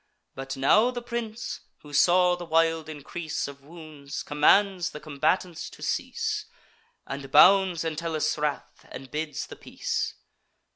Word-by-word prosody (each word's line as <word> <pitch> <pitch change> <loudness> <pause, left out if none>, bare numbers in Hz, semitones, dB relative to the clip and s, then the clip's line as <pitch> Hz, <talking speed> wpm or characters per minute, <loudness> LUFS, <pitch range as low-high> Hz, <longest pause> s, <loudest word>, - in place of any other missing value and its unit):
But 135 0 -6
now 210 - +4
the 245 -1 -5
prince, 235 0 -5 0.2
who 145 -1 -12
saw 180 +4 +5
the 175 - -8
wild 165 -1 +1
increase 155 +1 -4
Of 140 0 -10
wounds, 155 -3 -8
commands 180 +5 +3
the 150 - -9
combatants 155 +4 -1
to - - -13
cease, - - -2 0.6
And 135 0 -6
bounds 190 -2 +6
Entellus' 160 -1 -1
wrath, 150 -1 -3
and 130 -1 -10
bids 150 -4 -3
the - - -10
peace. - - -3
160 Hz, 135 wpm, -26 LUFS, 145-180 Hz, 0.6 s, bounds